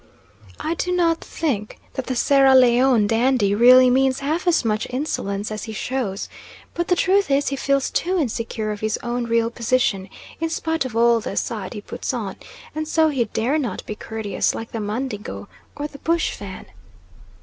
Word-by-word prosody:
I 320 - -1
do 360 +1 -2
not 335 -2 +2
think 230 -10 -3 0.2
that 265 - -5
the 255 - -1
Sierra 270 +2 +5
Leone 250 -2 +5
dandy 225 -1 +2
really 250 +3 +7
means 265 +1 +2
half 315 +6 -2
as 335 -8 +3
much 215 -1 0
insolence 215 -7 -3
as 215 - -4
he 220 - -6
shows; 215 -3 -3 0.5
but 345 +1 -2
the 360 - +3
truth 385 +1 +2
is 280 +1 +2
he 275 - -2
feels 275 0 0
too 370 +3 0
insecure 230 -6 -2
of 210 - -5
his 215 0 -1
own 240 0 -2
real 230 0 +1
position, 230 -5 0 0.3
in 325 0 -1
spite 320 -2 -1
of 235 -3 -4
all 235 0 +4
the 225 - -5
"side" 215 -1 -3
he 210 - -6
puts 255 - -4
on, 205 -5 -4 0.4
and 310 +1 -3
so 320 0 +3
he 260 -5 0
dare 245 +8 0
not 240 -10 -4
be - - -4
courteous 210 -2 -2
like 225 - -6
the 225 - -4
Mandingo 210 - -4 0.3
or 290 - -3
the 285 -1 -13
bush 335 +2 0
Fan. 195 -2 -8
250 Hz, 185 wpm, -22 LUFS, 215-285 Hz, 0.5 s, really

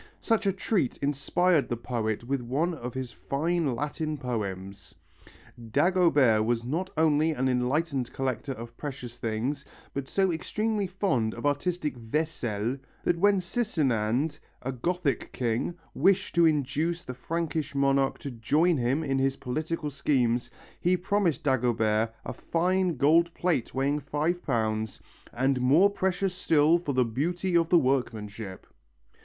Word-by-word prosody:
Such 225 -2 +1
a - - +4
treat 190 - -1
inspired 145 +4 +1
the 120 - -1
poet 115 -2 -2
with 135 +2 -1
one 145 +9 0
of 125 -5 -6
his 130 -2 -4
fine 155 -1 -1
Latin 150 +3 -3
poems. 100 - -5 0.7
Dagobert 145 - +4
was 115 +1 0
not 170 +9 -2
only 155 0 +3
an 130 -2 0
enlightened 130 +1 0
collector 135 +1 -2
of 115 -1 -9
precious 130 -5 -6
things 120 +5 -2 0.3
but 140 -1 -4
so 190 +2 +1
extremely 210 +5 -1
fond 180 - 0
of - - -6
artistic 150 +1 0
"vaisselle" 120 -3 -2 0.3
that 170 - +1
when 200 +1 +4
Sisinande, 150 - 0 0.2
a 135 - -2
Gothic 155 +3 -1
king, 120 +7 -1 0.2
wished 195 0 +2
to 170 -1 +5
induce 155 +3 0
the 125 - -6
Frankish 160 +2 -3
monarch 135 -1 +2
to 140 - -6
join 150 +9 +2
him 130 +5 +1
in 135 -2 0
his 135 0 +1
political 155 +4 -3
schemes 125 -4 +1 0.3
he 180 +1 +2
promised 185 -5 0
Dagobert 115 -5 +1
a - - -4
fine 180 -1 0
gold 165 +5 +4
plate 170 -10 0
weighing 140 +2 +1
five 150 +5 -1
pounds 110 -4 -1 0.3
"and 130 +1 +1
more 155 +11 +5
precious 190 -1 0
still 160 -2 +3
for 150 -5 -3
the 130 -1 +3
beauty 170 +10 -1
of 165 -1 +3
the 175 - +6
workmanship." 110 - -2
140 Hz, 140 wpm, -28 LUFS, 120-170 Hz, 0.7 s, the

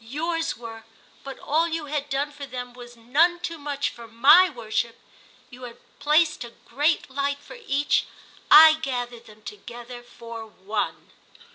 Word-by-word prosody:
Yours 325 +7 -3
were, 225 -1 -10 0.4
but 270 -1 -8
all 320 +3 0
you 325 -2 -4
had 290 0 -4
done 280 +2 -2
for 285 -1 -9
them 245 -1 -7
was 240 -1 -13
none 310 +10 +2
too 335 -2 -6
much 285 -1 -3
for 235 -1 -12
my 275 +11 +6
worship! 230 -3 -3 0.5
You 250 +1 -13
had 240 -2 -9 0.2
placed 305 -1 +2
a 235 - -9 0.2
great 295 +7 0
light 280 +1 -2
for 385 +12 -13
Each—I 305 +2 +4
gathered 245 -4 -4
them 215 0 -17
together 240 - -10
for 230 -2 -10
One!" 210 0 -5
270 Hz, 150 wpm, -24 LUFS, 235-300 Hz, 0.5 s, my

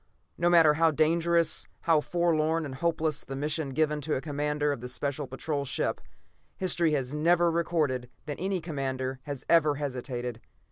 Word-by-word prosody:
No 175 +1 +2
matter 165 -3 +6
how 165 +2 +4
dangerous, 165 +2 +2
how 160 -2 +3
forlorn 165 -1 +1
and 140 - -6
hopeless 160 0 -1
the 135 - -7
mission 150 +1 -1
given 150 +2 0
to 150 +1 -1
a - - 0
commander 150 0 -1
of 125 -4 -5
a - - -4
Special 140 +2 -3
Patrol 140 +3 -3
ship, 135 - -2 0.6
history 170 -4 +2
has 135 -2 -1
never 170 +3 +3
recorded 155 -7 0 0.2
that 145 -2 -5
any 190 -1 -1
commander 135 -4 -3
has 145 -3 -6
ever 155 -3 +4
hesitated. 125 -4 -4
150 Hz, 160 wpm, -28 LUFS, 135-165 Hz, 0.6 s, matter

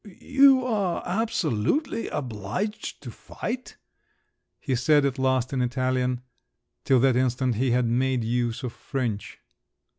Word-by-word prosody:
"You 270 -1 +5
are 205 -7 -1
absolutely 200 - 0
obliged 130 - -4
to - - -7
fight?" 255 +1 -6 0.8
he 135 - -2
said 145 +3 +3
at 135 -1 -1
last 130 -1 +1
in 130 - 0
Italian; 125 0 0 0.6
till 130 -2 +4
that 130 -2 +4
instant 125 0 +1
he 125 +4 0
had 125 +1 +2
made 125 +1 +1
use 120 +2 -1
of 125 - -4
French. 120 -7 -4
130 Hz, 125 wpm, -25 LUFS, 125-175 Hz, 0.8 s, You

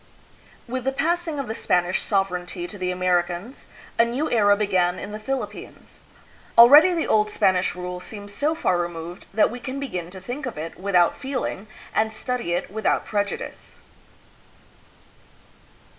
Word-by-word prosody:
With 255 +1 -3
the 270 - +2
passing 330 +2 -1
of 275 -3 -3
the 220 - -3
Spanish 180 -4 +1
sovereignty 180 -3 -1
to 205 - -11
the 180 0 -1
Americans, 180 +5 -1 0.3
a - - +8
new 250 +7 -2
era 205 -3 +4
began 185 -4 +1
in 200 - -7
the 215 - -6
Philippines. 270 +4 -6 0.6
Already 290 +10 +9
the 325 - 0
old 210 -1 +3
Spanish 185 -3 +2
rule 180 0 -5
seems 205 +2 -9
so 300 +8 0
far 180 - +1
removed 175 +1 -5
that 215 +1 +3
we 245 - -6
can 260 +2 -5
begin 180 -11 -4
to 190 +1 -10
think 245 +9 -5
of 235 - -6
it 160 +2 -5
without 180 -3 +3
feeling 255 -6 -4 0.3
and 220 0 +1
study 235 -4 -3
it 175 - -2
without 220 +1 0
prejudice. 205 -1 -4
205 Hz, 155 wpm, -24 LUFS, 180-250 Hz, 0.6 s, Already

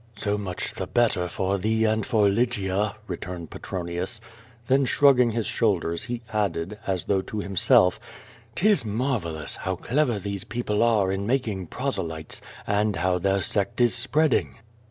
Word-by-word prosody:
"So 105 0 -1
much 95 -3 -4
the - - -5
better 110 -7 +1
for 95 +2 -1
thoe 110 +3 +1
and 110 0 0
for 110 -5 +3
Lygia," 100 -2 0
returned 90 -3 -6
Petronius. 90 +4 -4 0.5
Then 135 +1 +3
slirugging 125 -4 +4
his 115 -1 -1
shoulders, 95 -9 0
he 120 0 -5
added, 100 -1 -1
as 95 -3 -1
though 95 -2 +1
to 105 - -7
himself, 95 -2 +3 0.6
"^Tis 210 - +3
marvellous, 105 - -2
how 95 0 -2
clever 125 - 0
these 100 -1 -4
people 115 -3 -2
are 110 -5 +3
in 95 +1 -2
making 110 -8 -1
proselytes, 80 0 -3 0.2
and 105 0 +1
how 90 +1 +1
their 95 +1 +1
sect 100 +5 0
is 120 -1 +4
spreading." 145 +5 +2
105 Hz, 150 wpm, -25 LUFS, 95-120 Hz, 0.6 s, slirugging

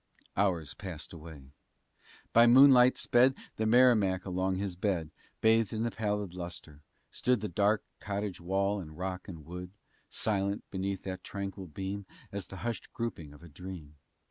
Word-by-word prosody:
Hours 90 -7 +1
passed 90 -6 -8
away. 75 -5 -11 0.8
By 115 +1 +7
moonlight 130 0 +8
sped 125 +2 +4 0.2
The 110 - +1
Merrimac 110 -6 +4
along 95 0 0
his 95 -1 -3
bed. 90 -4 -1 0.3
Bathed 110 -1 +4
in 110 0 -1
the 115 - 0
pallid 105 -4 -2
lustre, 85 -4 -8 0.3
stood 110 -7 0
Dark 105 +3 +2 0.2
cottage 100 -3 -4
wall 100 +3 0
and 80 -4 -9
rock 90 0 -4
and 80 -6 -9
wood, 90 +1 -7 0.4
Silent, 100 -1 -1
beneath 95 0 -3
that 95 -1 -5
tranquil 100 -1 -5
beam, 95 +5 -5 0.2
As 100 -2 -5
the 95 - -9
hushed 120 -2 -4
grouping 100 -11 -4
of 75 +3 -15
a - - -10
dream. 80 -2 -9
95 Hz, 150 wpm, -31 LUFS, 90-105 Hz, 0.8 s, moonlight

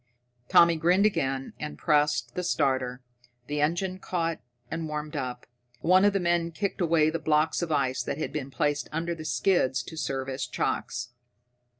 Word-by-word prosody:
Tommy 170 -1 +6
grinned 180 +5 +3
again 135 -9 0
and 150 0 -5
pressed 145 -5 +1
the 180 - -2
starter. 130 -6 0 0.4
The 145 +2 -2
engine 180 +5 0
caught 165 -3 -2 0.3
and 160 0 -3
warmed 150 0 -5
up. 125 -3 -4 0.4
One 185 +3 +5
of 205 - +4
the 195 - +1
men 170 -1 +1
kicked 200 +2 -2
away 160 -2 +3
the 165 - -2
blocks 155 +2 +2
of 170 -2 -2
ice 135 -3 +1
that - - -3
had 155 - -4
been 140 -3 -3
placed 145 +1 -1
under 165 +2 -2
the 160 -2 -8
skids 145 -7 +1
to 160 - -9
serve 135 -4 -2
as 130 -1 -3
chocks. 120 0 -2
155 Hz, 175 wpm, -27 LUFS, 135-170 Hz, 0.4 s, Tommy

